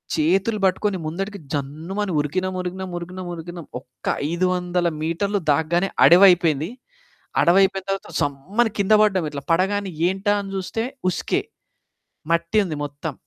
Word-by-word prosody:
చేతులు 190 +7 +1
పట్టుకొని 190 +1 +1
ముందటికి 195 +5 -4
జన్నుమని 160 +8 -3
ఉరికినాం, 185 +6 -1
ఉరికినాం, 185 +1 -5
ఉరికినాం, 180 +2 -7
ఉరికినాం. 170 0 -8
ఒక్క 125 -1 -21 0.2
500 180 0 0
మీటర్లు 195 +6 -1
దాగ్గానే 170 +6 +1
అడవైపోయింది. 175 -4 +6 0.7
అడవి 175 +2 +5
అయిపోయిన 195 0 +1
తర్వాత 195 0 -3
సమ్మని 195 - 0
కింద 200 +2 +3
పడ్డాం. 190 -5 +2
ఇట్లా 145 -1 -6
పడగానే 195 +3 +1 0.2
ఏంటా 195 +3 0
అని 195 - -7
చూస్తే 195 +4 -3 0.3
ఉస్కే. 180 - -1 0.9
మట్టి 170 +5 +1
ఉంది 170 -5 -4
మొత్తం. 145 +1 -5
180 Hz, 125 wpm, -22 LUFS, 165-195 Hz, 0.9 s, అడవైపోయింది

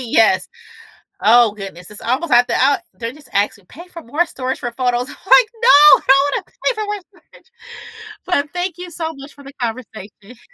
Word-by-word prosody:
Yes. 225 -5 +2 0.7
Oh 235 0 +5
goodness, 195 -3 -10
it's 210 - -10
almost 260 +8 -2
at 245 +1 +5
the - - -1
ou 275 +2 +3 0.2
they're 230 0 -6
just 290 -1 -17
asking 200 -1 -1
pay 340 - -13
for 335 -2 -11
more 295 +8 -1
storage 260 -6 -5
for 240 - -5
photos. 245 0 -1
I'm - - -11
like, 470 -3 +6
"No. 300 -11 +7
I - - -22
don't 275 +1 +4
wanna - - -5 0.2
pay - - +1
for 430 -1 -4
more 415 0 -4
storage." - - -23 0.8
Well, 350 -6 +1
thank 355 -1 -3
you 360 0 -8
so 325 -1 -5
much 275 +1 -13
for 285 - -16
the 275 - -12
conversation. 225 -1 -8
260 Hz, 200 wpm, -18 LUFS, 230-325 Hz, 0.8 s, No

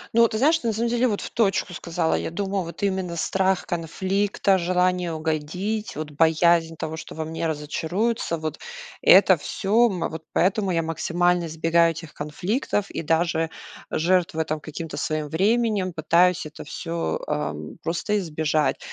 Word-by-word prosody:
Ну 235 - +6
вот, 230 - +6
ты - - 0
знаешь, 290 +7 +4
что 285 -7 -3
на 225 - +1
самом 235 +2 0
деле 240 +2 +2
в 210 - +1 0.2
точку 200 -4 +1
сказала. 170 -1 -1
Я - - -1
думаю, 195 +1 -2
вот 170 +4 -8
именно 190 -3 -1
страх 190 +3 +1
конфликта, 190 +2 0
желание 180 0 +1
угодить, 160 +7 -3
вот 155 0 -5
боязнь 165 +1 +3
того, 160 +1 -4
что - - -9
во 160 0 -3
мне 165 +1 -3
разочаруются, 165 +6 -1
вот 155 0 -5 0.4
это - - +7
всё. 225 +4 +2
Вот 165 -4 -4
поэтому 195 +2 +1
я 165 -2 +1
максимально 175 +2 +1
избегаю 165 +1 +3
этих 165 -1 -10
конфликтов 195 - -2
и - - -3
даже 165 0 +1 0.4
жертвую, 165 -2 +1
там, 155 -1 -2
каким-то 160 +1 -7
своим 155 -1 -2
временем, 205 +2 +1
пытаюсь 170 +2 +3
это 155 - -9
всё, 165 - -3
ам, 75 +1 -4
просто 190 +5 -1
избежать. 155 -4 0
170 Hz, 155 wpm, -24 LUFS, 160-195 Hz, 0.4 s, это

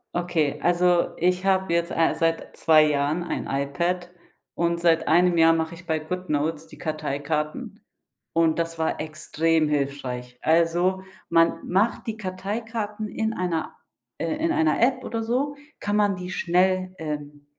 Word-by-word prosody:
Okay, 165 -5 0
also 175 0 +3
ich 180 +1 +1
habe 190 -2 +2
jetzt, 170 0 +1
äh, 165 -1 +2
seit 165 0 -1
2 155 -1 +6
Jahren 150 +3 0
ein 175 - -3
iPad, 170 +6 -1 0.4
und 170 0 0
seit 165 -1 +3
1 175 +1 +4
Jahr 165 0 +6
mache 160 0 -1
ich 170 +2 -14
bei 160 -2 0
Goodnotes 155 -2 -2
die - - -15
Karteikarten, 150 -1 -3 0.5
und 165 -1 +3
das 165 0 -2
war 160 - 0
extrem 160 0 0
hilfreich. 130 -4 -3
Also, 175 +3 +2 0.3
man 165 0 +3
macht 200 +7 +1
die 220 -1 -3
Karteikarten 210 +2 -4
in 220 +2 -2
einer 175 -5 -2 0.4
äh, - - -2
in 330 +2 0
einer 320 -4 +2
App 255 +1 +2
oder 230 -2 -3
so 260 +5 -1 0.2
kann 205 0 -1
man 205 -2 +3
die 180 0 -6
schnell, 185 +1 +1
ähm, 150 -3 -6
170 Hz, 150 wpm, -25 LUFS, 155-185 Hz, 0.5 s, 2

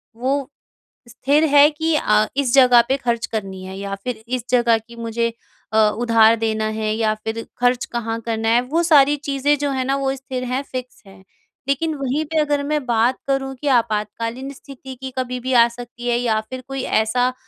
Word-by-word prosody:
वो 265 +3 -1 0.6
स्थिर 275 +6 +1
है 290 +1 +8
कि 320 +1 -1
अ, 215 -7 +3
इस 265 -4 +1
जगह 250 -3 +7
पे 270 - +1
खर्च 235 -3 -1
करनी 195 -4 -5
है 190 0 -8
या 200 0 -4
फिर 240 -3 -5
इस 250 -1 -2
जगह 235 -2 +3
की 235 - -13
मुझे 230 0 -2 0.4
अ, - - +2 0.2
उधार 230 -1 +4
देना 220 0 -1
है 215 0 -1
या 220 -1 +1
फिर 225 +1 -4
खर्च 245 0 +1
कहाँ 230 -1 -4
करना 225 0 -2
है 235 +2 +4
वो 305 +7 -1
सारी 295 -3 +5
चीज़ें 285 0 0
जो 285 0 -1
हैं 260 -1 -1
ना 270 +1 +1
वो 270 -1 -1
स्थिर 260 -1 -6
हैं 255 +2 -2
फ़िक्स 255 -2 -8
हैं। 195 -1 -16 0.4
लेकिन 315 +4 0
वहीं 275 +2 -1
पे 320 +1 -3
अगर 295 -1 +1
मैं 295 -1 -1
बात 240 +1 +2
करूँ 270 -1 -1
कि 295 - -3
आपातकालीन 230 +4 -3
स्थिति 265 -1 -11
की 265 - -5
कभी 250 -1 -2
भी 260 +1 -3
आ 235 -1 +6
सकती 240 0 -9
है 240 -1 +2
या 225 -3 +1
फिर 255 0 -6
कोई 270 0 -4 0.2
ऐसा 245 +3 +1
250 Hz, 200 wpm, -20 LUFS, 230-275 Hz, 0.6 s, है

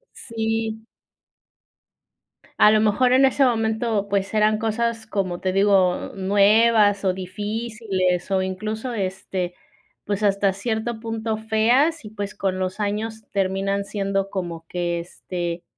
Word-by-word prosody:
Sí. 225 -1 -3 1.8
A 210 - +7
lo 215 0 +4
mejor 220 +4 +3
en 265 +1 +5
ese 270 +1 +4
momento, 220 -3 0
pues, 200 0 -1
eran 215 0 +3
cosas, 225 0 -1
como 185 -4 -2
te 185 -1 -1
digo, 195 -2 +2
nuevas 205 +1 +4
o 185 - +3
difíciles, 195 -1 -2
o 190 -1 +2
incluso 215 +6 -4
este, 185 -3 -3 0.5
pues 205 +1 -2
hasta 200 -1 +2
cierto 220 +2 -3
punto 225 -1 -3
feas 235 +8 +2
y 210 - -8
pues 205 -2 -5
con 185 -1 -2
los 185 +3 -3
años 220 +2 -2
terminan 195 +1 0
siendo 195 -1 -2
como 170 -4 -5
que 175 -1 -2
este, 175 0 -5
205 Hz, 130 wpm, -23 LUFS, 190-220 Hz, 1.8 s, A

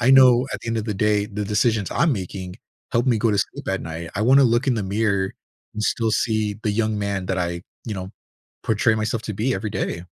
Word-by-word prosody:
I 125 +2 +4
know 130 -1 +7
at - - -4
the - - -7
end 115 - -1
of 110 - -1
the 105 - -2
day, 105 +1 +2
the 105 -1 -4
decisions 105 -1 +1
I'm 170 -4 +2
making 95 -3 -5 0.4
help 120 +3 +2
me 120 - +3
go 110 +1 +2
to 100 - +1
sleep - - -3
at 95 0 0
night. 80 +1 -6
I 105 - -2
wanna 135 +5 +6
look 120 +3 +2
in 130 - +3
the 110 - -1
mirror, 100 -1 0 0.4
and 105 - -3
still 115 0 +1
see 110 -1 0
the 105 - 0
young 110 0 0
man 100 -2 -2
that 95 - -1
I, 85 -1 -2 0.2
you 110 - -4
know, 95 -1 -6 0.5
portray 110 +1 +2
myself 110 +1 -1
to 105 - -4
be 120 +6 0
every 110 - -3
day. 90 -4 -3
105 Hz, 240 wpm, -23 LUFS, 100-115 Hz, 0.5 s, know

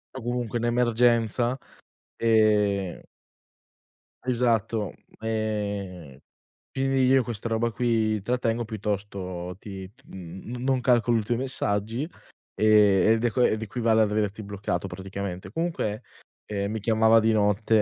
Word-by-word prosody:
O 130 - -6
comunque 120 -1 -2
un 120 - -2
emergenza, 120 +1 +2 0.6
ehm 105 -4 +2 1.2
Esatto, 115 -5 0 0.3
ehm, 100 -8 -3 0.5
quindi 135 -1 +1
io 130 0 +5
questa 115 -1 -4
roba 115 +1 0
qui 110 -3 +1
trattengo, 120 +1 0
piuttosto 100 -4 -4
ti 95 -2 -8
ti - - -26
n 95 +7 -8
non 130 -1 +1
calcolo 120 -2 +3
i 110 - 0
tuoi 120 +2 -1
messaggi, 115 -2 -1 0.5
e 105 0 +5
ed - - -5
ed 120 -2 +2
equivale 110 +1 +1
ad 105 -1 +2
averti 105 0 -1
bloccato 100 -2 -3
praticamente. 95 0 -6
Comunque, 160 -8 -2 0.5
ehm, 100 -1 -2
mi 110 - -3
chiamava 110 +1 +4
di 110 0 +2
notte, 105 +1 +3
110 Hz, 120 wpm, -26 LUFS, 100-120 Hz, 1.2 s, io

